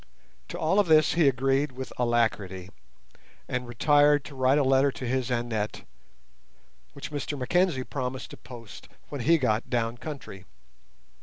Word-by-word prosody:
To - - -6
all 195 - +2
of 205 - +3
this 155 -1 +5
he 165 -3 +4
agreed 135 +1 +1
with 130 +1 -7
alacrity, 105 -6 0 0.8
and 125 -1 -3
retired 145 +3 +3
to 145 - -10
write 130 +1 +3
a 145 - +3
letter 135 +1 +3
to 130 - -7
his 130 0 -1
Annette, 120 -3 -2 1.1
which 140 - -8
Mr 145 0 -4
Mackenzie 140 +2 +1
promised 130 -1 -5
to - - -10
post 120 -3 -12 0.2
when 145 -3 -5
he 165 +7 +4
got 115 -5 0
down 115 0 -1
country. 130 -11 -8
130 Hz, 150 wpm, -27 LUFS, 120-145 Hz, 1.1 s, this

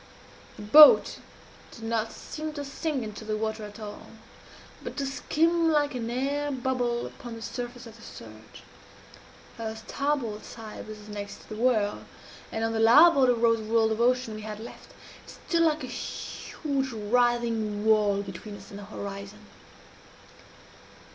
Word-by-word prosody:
The 210 - -9
boat 295 +9 +8 0.5
did 230 - -12
not 225 0 -1
seem 310 0 -6
to 290 -1 -5
sink 280 -1 -3
into 215 0 -7
the 215 0 -2
water 220 0 -3
at 210 +1 -11
all, 210 -1 -8 0.7
but - - -7
to 280 - -1
skim 325 +4 +1
like 295 -2 +2
an 235 -2 -3
air 280 +4 -1
bubble 250 -3 -1
upon 240 -4 -9
the 225 - -9
surface 245 0 -6
of 230 -1 -12
the - - -16
surge. - - -12 1.0
Her 220 -1 -4
starboard 230 -1 -2
side 220 -2 -9
was 210 -1 -10
next 205 -1 -8
the 215 - -6
whirl, 220 -3 +1 0.5
and 225 - -2
on 225 - 0
the 220 - -1
larboard 270 +4 +7
arose 230 -1 +3
the 215 - -7
world 225 -1 +3
of 220 +1 -1
ocean 250 -1 +2
we 215 - -7
had 210 0 -6
left. 230 - -11 0.3
It - - -16 0.2
stood 335 -1 +3
like 315 -3 +2
a - - -2
huge 270 +2 -4
writhing 225 -1 0
wall 210 -2 +3
between 200 +2 -8
us 195 0 -14
and 200 - -8
the 205 - -9
horizon. 200 0 -8
230 Hz, 160 wpm, -27 LUFS, 215-265 Hz, 1.0 s, boat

